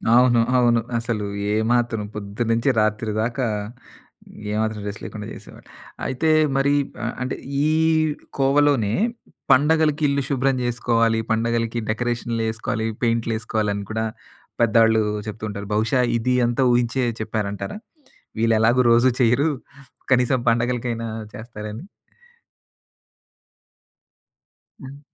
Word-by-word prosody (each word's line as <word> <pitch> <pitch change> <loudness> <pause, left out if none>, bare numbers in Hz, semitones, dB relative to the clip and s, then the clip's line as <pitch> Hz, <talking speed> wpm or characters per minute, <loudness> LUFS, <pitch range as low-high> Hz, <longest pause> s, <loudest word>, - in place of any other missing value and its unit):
అవును. 120 -1 +5 0.2
అవును. 120 -2 +3 0.2
అసలు 115 -3 -2 0.3
ఏమాత్రం 115 0 +1
పొద్దునుంచి 115 +4 -1
రాత్రి 110 0 0
దాకా 120 +3 -1 1.1
ఏ - - -2
మాత్రం 110 -1 -2
రెస్ట్ 105 +1 -6
లేకుండా 105 -1 -7
చేసేవాడిని. - - -14 0.3
అయితే 135 +5 0 0.3
మరి 140 +1 +2 0.3
ఆహ్, 115 - -2
అంటే 130 0 -2 0.3
ఈ - - +3 0.7
కోవలోనే 135 -5 +3 0.6
పండగలకిల్లు 150 0 +3
శుభ్రం 135 0 +1
చేసుకోవాలి 115 -2 +1
పండగలకి 115 +1 0
డెకరేషన్‌లేసుకోవాలి, 115 0 -2 0.2
పెయింటులేసుకోవాలని 110 -3 -1
కూడా 110 0 -1 0.6
పేదోళ్లు 115 -1 +4 0.2
చెప్తుంటారు. 105 -2 -5
బహుశా 110 +5 +1 0.2
ఇది 125 +2 0
అంతా 120 +3 +1
ఊహించే 120 +1 +1 0.2
చెప్పారంటారా? 110 - -3 0.6
వీళ్లెలాగో 115 +2 +3
రోజూ 120 +2 +5
చెయ్యరు. 125 +6 +3 0.6
కనీసం 125 0 +2
పండగలకైనా 120 0 -1 0.3
చేస్తారని. 110 +1 -8 3.0
హ్మ్. 135 +2 -10
115 Hz, 95 wpm, -22 LUFS, 110-125 Hz, 3.0 s, అవును